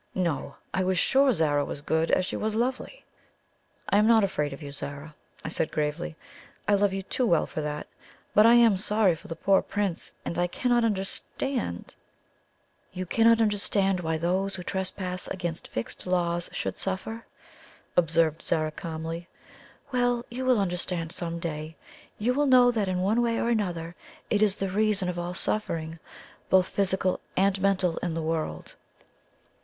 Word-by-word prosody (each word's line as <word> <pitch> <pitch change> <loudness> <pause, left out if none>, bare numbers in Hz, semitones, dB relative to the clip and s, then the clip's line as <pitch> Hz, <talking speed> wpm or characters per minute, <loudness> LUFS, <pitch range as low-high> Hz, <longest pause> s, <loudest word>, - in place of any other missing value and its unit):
No! 170 -7 -1 0.2
I 190 - +1
was 185 0 +1
sure 270 +8 +4
Zara 150 -7 +2
was 145 - -6
good 160 +2 +1
as 185 - +3
she - - -4
was 215 0 -1
lovely. 255 - -2 0.8
"I - - +3
am 210 +1 +4
not 225 -2 +6
afraid 150 -7 0
of 140 - -7
you, 140 - -7
Zara," 140 +2 -7 0.3
I - - -2
said 160 - -1
gravely; 150 +2 -2 0.5
"I 205 - +4
love 200 0 +3
you 195 0 -3
too 255 - -2
well 170 -6 +3
for 155 - -5
that. 150 0 -4 0.5
But 210 +2 +7
I 235 - +7
am 230 -4 +6
sorry 210 -1 +2
for - - -14
the 165 - -5
poor 195 +3 +3
Prince; 200 -5 -3
and 170 - -3
I 175 - +2
cannot 240 +5 +1
understand 210 - -2 0.5
" - - -41
"You 185 0 -4
cannot 230 +4 +4
understand 200 -3 +1
why 160 -2 -1
those 185 +4 0
who 180 - -6
trespass 185 -1 -3
against 175 -3 -4
fixed 115 +9 -5
laws 175 -1 0
should - - -3
suffer?" 220 +4 -4 0.7
observed 165 -2 +2
Zara 155 -1 0
calmly. 165 +1 -5 0.6
"Well, 245 -1 +1
you 255 +2 -4
will 255 -3 +4
understand 180 -3 -1
some 170 -1 -4
day. 160 -1 -5 0.4
You 240 +4 +1
will 290 +2 +2
know 250 -2 +6
that 215 -4 0
in 180 -1 0
one 215 +5 +2
way 230 -1 +1
or 235 - 0
another 175 -7 -1 0.4
it 210 - +2
is 205 -2 +4
the 195 -1 -2
reason 205 -2 +2
of 175 -1 -3
all 175 +1 -4
suffering, 165 -6 -1 0.5
both 190 -1 +4
physical 190 -2 +1 0.2
and 195 0 +2
mental, 190 -3 +2
in 170 -2 -2
the 165 - -2
world." 155 - -3
185 Hz, 170 wpm, -27 LUFS, 165-210 Hz, 0.8 s, But